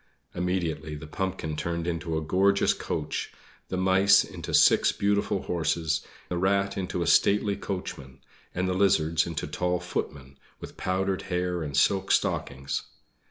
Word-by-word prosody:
Immediately 85 Hz, -4 st, -2 dB
the 75 Hz, +1 st, -8 dB
pumpkin 90 Hz, -2 st, -3 dB
turned 85 Hz, +1 st, -3 dB
into 85 Hz, -1 st, -2 dB
a 80 Hz, -, -2 dB
gorgeous 95 Hz, +5 st, +3 dB
coach, -, -, -4 dB, 0.4 s
the 95 Hz, -, -3 dB
mice 95 Hz, +2 st, +5 dB
into -, -, -8 dB
six -, -, +5 dB
beautiful 100 Hz, -1 st, 0 dB
horses, 80 Hz, -1 st, 0 dB, 0.3 s
the 90 Hz, -, -2 dB
rat 100 Hz, +1 st, +1 dB
into 90 Hz, -2 st, -2 dB
a -, -, -3 dB
stately 100 Hz, +4 st, +3 dB
coachman, 70 Hz, -11 st, -6 dB, 0.4 s
and 90 Hz, +1 st, 0 dB
the 90 Hz, -, 0 dB
lizards 85 Hz, -4 st, +2 dB
into 85 Hz, -2 st, -3 dB
tall 90 Hz, 0 st, -1 dB
footmen, 70 Hz, -6 st, -5 dB, 0.2 s
with -, -, -10 dB
powdered 95 Hz, +1 st, -1 dB
hair 90 Hz, -1 st, -1 dB
and 70 Hz, -3 st, -3 dB
silk 95 Hz, +6 st, +2 dB
stockings. 70 Hz, 0 st, 0 dB
90 Hz, 145 wpm, -27 LUFS, 80-95 Hz, 0.4 s, mice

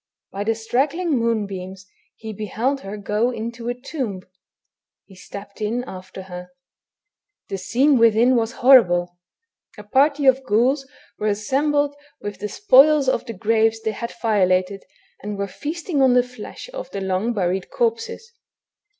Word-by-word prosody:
By 200 Hz, -, -4 dB
the 225 Hz, +1 st, +1 dB
straggling 280 Hz, +10 st, -1 dB
moonbeams 195 Hz, -5 st, -3 dB, 0.3 s
he 220 Hz, -1 st, -8 dB
beheld 225 Hz, +7 st, -2 dB
her 200 Hz, +2 st, -7 dB
go 210 Hz, +3 st, 0 dB
into 235 Hz, 0 st, -5 dB
a 245 Hz, -, -2 dB
tomb; 250 Hz, -, -5 dB, 0.8 s
he 195 Hz, -, -17 dB
stepped 200 Hz, +2 st, -11 dB
in 230 Hz, +4 st, -1 dB
after 185 Hz, -3 st, -9 dB
her. 180 Hz, -1 st, -9 dB, 1.0 s
The 195 Hz, -, -3 dB
scene 260 Hz, +8 st, +3 dB
within 230 Hz, +3 st, +5 dB
was 230 Hz, -1 st, +1 dB
horrible. 175 Hz, -9 st, +5 dB, 0.6 s
A 210 Hz, -, -9 dB
party 280 Hz, +6 st, +2 dB
of 265 Hz, 0 st, +4 dB
ghouls 260 Hz, +6 st, +1 dB, 0.3 s
were 215 Hz, -, -1 dB
assembled 285 Hz, +8 st, 0 dB, 0.2 s
with 205 Hz, -2 st, -6 dB
the 210 Hz, +1 st, -4 dB
spoils 300 Hz, -, +5 dB
of 255 Hz, -1 st, 0 dB
the 230 Hz, -, -5 dB
graves 225 Hz, +2 st, +1 dB
they 220 Hz, -, 0 dB
had 235 Hz, +3 st, -6 dB
violated, 190 Hz, -3 st, +1 dB, 0.4 s
and 205 Hz, 0 st, -5 dB
were 200 Hz, -, -1 dB
feasting 305 Hz, -, -3 dB
on 260 Hz, -2 st, +5 dB
the 250 Hz, -, +5 dB
flesh 250 Hz, -, -10 dB
of -, -, -6 dB
the 195 Hz, -, -5 dB
long 190 Hz, +4 st, -1 dB
buried 185 Hz, -2 st, -1 dB
corpses. 460 Hz, 0 st, -2 dB
225 Hz, 150 wpm, -22 LUFS, 200-265 Hz, 1.0 s, within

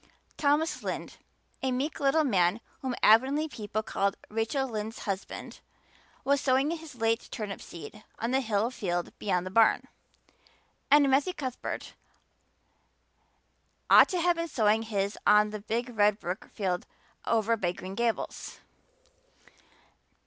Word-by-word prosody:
Thomas 300 Hz, +3 st, +1 dB
Lynde -, -, -5 dB, 0.4 s
a 265 Hz, -, 0 dB
meek 270 Hz, +5 st, -2 dB
little 285 Hz, +3 st, +3 dB
man 190 Hz, -6 st, +2 dB, 0.2 s
whom 260 Hz, -2 st, -2 dB
Avonlea 265 Hz, +8 st, +5 dB
people 215 Hz, -5 st, -4 dB
called 200 Hz, -1 st, -1 dB
"Rachel 225 Hz, +5 st, -1 dB
Lynde's 220 Hz, -1 st, -4 dB
husband" 195 Hz, -1 st, -5 dB, 0.6 s
was 280 Hz, 0 st, +2 dB
sowing 265 Hz, +3 st, +2 dB
his 325 Hz, -4 st, -7 dB
late 225 Hz, 0 st, 0 dB
turnip 210 Hz, -3 st, -5 dB
seed 170 Hz, +6 st, -10 dB
on 230 Hz, +2 st, -2 dB
the 265 Hz, +1 st, +2 dB
hill 220 Hz, 0 st, 0 dB
field 175 Hz, -7 st, -3 dB
beyond 180 Hz, -3 st, 0 dB
the 185 Hz, -, -5 dB
barn; 225 Hz, +2 st, +4 dB, 1.0 s
and 285 Hz, 0 st, +6 dB
Matthew 290 Hz, +7 st, +2 dB
Cuthbert 260 Hz, -6 st, -5 dB, 2.0 s
ought -, -, +9 dB
to 365 Hz, -, -1 dB
have 345 Hz, 0 st, +2 dB
been 335 Hz, 0 st, -2 dB
sowing 220 Hz, -6 st, +2 dB
his 200 Hz, -2 st, -2 dB
on 210 Hz, 0 st, +5 dB
the 215 Hz, -1 st, -6 dB
big 235 Hz, +4 st, -2 dB
red 210 Hz, 0 st, +3 dB
brook 180 Hz, +3 st, -5 dB
field 185 Hz, -3 st, -2 dB, 0.4 s
away -, -, +1 dB
over 225 Hz, +1 st, +2 dB
by 180 Hz, -5 st, -1 dB
Green 185 Hz, +1 st, -8 dB
Gables. 235 Hz, +2 st, -2 dB
225 Hz, 135 wpm, -29 LUFS, 205-270 Hz, 2.0 s, ought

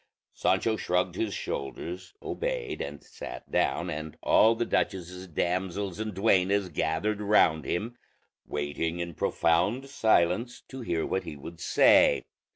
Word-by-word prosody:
Sancho 110 Hz, +4 st, +1 dB
shrugged 90 Hz, -1 st, 0 dB
his 105 Hz, +3 st, -2 dB
shoulders, 90 Hz, +5 st, -5 dB
obeyed, -, -, -3 dB
and 70 Hz, 0 st, -6 dB
sat -, -, -9 dB
down, -, -, +1 dB
and 75 Hz, 0 st, -6 dB
all 115 Hz, +1 st, +5 dB
the 120 Hz, -, -1 dB
duchess's 90 Hz, -3 st, -2 dB
damsels 95 Hz, +3 st, -2 dB
and 110 Hz, -3 st, -3 dB
duennas 95 Hz, -1 st, +2 dB
gathered 85 Hz, +7 st, -1 dB
round 85 Hz, -8 st, +3 dB
him, 110 Hz, -, -2 dB, 0.5 s
waiting 75 Hz, +3 st, -2 dB
in 85 Hz, -1 st, -4 dB
profound 90 Hz, -, +1 dB
silence 110 Hz, -2 st, +2 dB
to 130 Hz, -1 st, -7 dB
hear 85 Hz, -8 st, -1 dB
what 95 Hz, -, -1 dB
he -, -, -6 dB
would 80 Hz, +4 st, -10 dB
say. -, -, +5 dB
90 Hz, 135 wpm, -28 LUFS, 85-105 Hz, 0.5 s, all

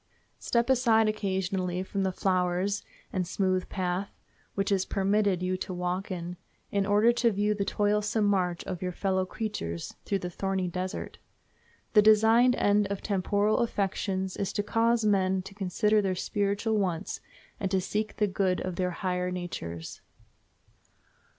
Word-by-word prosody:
Step 235 Hz, 0 st, +1 dB
aside 235 Hz, -4 st, +4 dB
occasionally 190 Hz, -3 st, -1 dB
from 195 Hz, +1 st, -3 dB
the 190 Hz, -1 st, +1 dB
flowers 185 Hz, +2 st, 0 dB, 0.3 s
and 185 Hz, -2 st, -1 dB
smooth 185 Hz, 0 st, 0 dB
paths 185 Hz, +1 st, -2 dB, 0.5 s
which 195 Hz, 0 st, 0 dB
it -, -, +5 dB
is 190 Hz, -, -1 dB
permitted 195 Hz, -2 st, +1 dB
you 185 Hz, 0 st, 0 dB
to 185 Hz, 0 st, -5 dB
walk 180 Hz, +3 st, -2 dB
in, 175 Hz, -1 st, -5 dB, 0.3 s
in 200 Hz, -1 st, +1 dB
order 210 Hz, +3 st, +5 dB
to 240 Hz, 0 st, +2 dB
view 205 Hz, +1 st, +1 dB
the 200 Hz, -1 st, -1 dB
toilsome 210 Hz, +1 st, +1 dB
march 180 Hz, -4 st, +1 dB
of 180 Hz, -, -5 dB
your 180 Hz, -1 st, -2 dB
fellow 190 Hz, 0 st, 0 dB
creatures 175 Hz, -, -4 dB
through 200 Hz, -, 0 dB
the 180 Hz, -, -4 dB
thorny 190 Hz, 0 st, -1 dB
desert. 185 Hz, +1 st, -4 dB, 0.7 s
The 210 Hz, -, +8 dB
designed 220 Hz, +4 st, +5 dB
end 205 Hz, -2 st, +3 dB
of 200 Hz, 0 st, -4 dB
temporal 205 Hz, +1 st, +1 dB
afflictions 190 Hz, -3 st, -1 dB
is 200 Hz, -, -1 dB
to 205 Hz, -, 0 dB
cause 230 Hz, +1 st, +2 dB
men 190 Hz, -2 st, +2 dB
to 195 Hz, -, -10 dB
consider 210 Hz, +2 st, +2 dB
their 190 Hz, -2 st, 0 dB
spiritual 205 Hz, +3 st, 0 dB
wants, 180 Hz, -2 st, -2 dB, 0.4 s
and 195 Hz, -3 st, -1 dB
to 190 Hz, 0 st, +2 dB
seek 210 Hz, +3 st, -2 dB
the 210 Hz, -, +2 dB
good 190 Hz, -2 st, 0 dB
of 185 Hz, -2 st, -4 dB
their 180 Hz, -1 st, +1 dB
higher 180 Hz, 0 st, -2 dB
natures. 130 Hz, -, -6 dB
195 Hz, 155 wpm, -28 LUFS, 185-210 Hz, 0.7 s, The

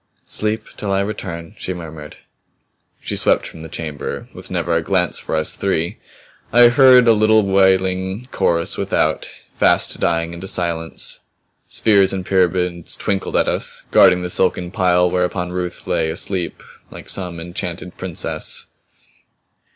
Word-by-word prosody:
"Sleep 110 Hz, 0 st, -2 dB
till 100 Hz, -2 st, -3 dB
I 95 Hz, 0 st, +2 dB
return," 85 Hz, -5 st, -5 dB
she 95 Hz, -, -4 dB
murmured. 80 Hz, -3 st, -9 dB, 0.9 s
She -, -, -4 dB
swept -, -, +2 dB
from 80 Hz, -, -10 dB
the 80 Hz, -, -9 dB
chamber 75 Hz, -2 st, -5 dB
with -, -, -10 dB
never 85 Hz, -1 st, -1 dB
a 85 Hz, -, +2 dB
glance 90 Hz, +1 st, 0 dB
for -, -, -4 dB
us 80 Hz, 0 st, 0 dB
three. 90 Hz, 0 st, -1 dB, 0.5 s
I 120 Hz, +1 st, +7 dB
heard 125 Hz, -1 st, +6 dB
a 115 Hz, -, +7 dB
little 110 Hz, 0 st, +4 dB
wailing 95 Hz, +2 st, +2 dB
chorus 85 Hz, -1 st, 0 dB
without, -, -, 0 dB, 0.2 s
fast -, -, +2 dB
dying 85 Hz, 0 st, 0 dB
into 85 Hz, +3 st, -7 dB
silence. 85 Hz, -3 st, -1 dB, 0.5 s
Spheres 100 Hz, -3 st, +3 dB
and 95 Hz, -1 st, -4 dB
pyramids 90 Hz, -2 st, +1 dB
twinkled 100 Hz, -1 st, -2 dB
at -, -, +2 dB
us, -, -, -2 dB
guarding 90 Hz, 0 st, +5 dB
the 90 Hz, -, -3 dB
silken 90 Hz, -1 st, +1 dB
pile 90 Hz, -2 st, +3 dB
whereon 90 Hz, 0 st, -1 dB
Ruth 90 Hz, -1 st, -4 dB
lay 80 Hz, -1 st, 0 dB
asleep 90 Hz, +2 st, -3 dB, 0.3 s
like -, -, -11 dB
some 90 Hz, -3 st, -5 dB
enchanted 85 Hz, +1 st, -6 dB
princess. 90 Hz, -3 st, -2 dB
90 Hz, 145 wpm, -19 LUFS, 85-95 Hz, 0.9 s, I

